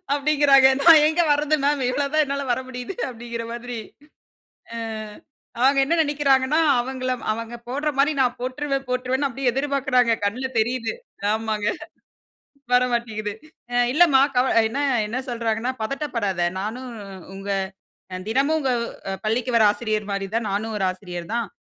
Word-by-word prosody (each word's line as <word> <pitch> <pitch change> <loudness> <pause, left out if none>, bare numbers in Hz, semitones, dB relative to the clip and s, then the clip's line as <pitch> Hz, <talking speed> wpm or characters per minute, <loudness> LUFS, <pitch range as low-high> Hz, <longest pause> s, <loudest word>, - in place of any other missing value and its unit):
அப்டிங்கிறாங்க 285 -2 +5
நான் 325 -2 +8
எங்கே 335 +2 +2
வர்றது? 295 +1 +1
மேம் 285 -1 +2
இவ்ளோ 280 +2 0
தான் 310 - +4
என்னால 280 0 -3
வர 250 - -1
முடியுது 250 +7 -6
அப்டிங்கிற 235 -1 -6
மாரி. 240 +1 -6 1.0
அ - - -5 0.8
அவங்க 275 +2 +4
என்ன 300 +5 0
நெனைக்கிறாங்கன்னா, 285 -1 +2 0.2
அவங்கள 255 +1 -3 0.2
அவங்க 230 +2 -5
போடுற 290 +4 -1
மாரி 285 +3 +4
நான் 250 -1 +1
போட்ருவேன் 270 +2 -3
போட்ருவேன்னு 255 +2 0
அப்டியே 265 -1 -1
எதிர்பார்க்குறாங்க. 270 -2 +1
கண்ல 250 +6 -2
தெரியுது. 235 +1 -1 0.4
ஆமாங்க. 220 -1 -1 1.1
வர 250 - +5
மாட்டேங்குது. 215 -3 -2 0.4
அ - - 0 0.2
இல்லம்மா 300 -5 +5 0.2
கவலை 250 -3 +4
என்ன 275 +5 -2 0.3
என்ன 245 +5 -3
சொல்றாங்கன்னா, 230 +1 -1
பதட்டப்படாத, 220 - -1
நானும் 240 +6 -5 0.5
உங்க 195 +1 -7 0.8
தினமும் 275 +6 +2
உ - - -1
உங்க 270 -3 -1 0.6
பள்ளிக்கு 230 +3 0
வர்ற 220 - +6
ஆசிரியர் 215 -1 -3
மாதிரி 195 0 -2
தான் 230 -2 0
நானும் 215 +2 -2
ஒரு 195 - 0
ஆசிரியர் 180 -1 -8
தான். 235 -2 -1
250 Hz, 140 wpm, -23 LUFS, 225-275 Hz, 1.1 s, நான்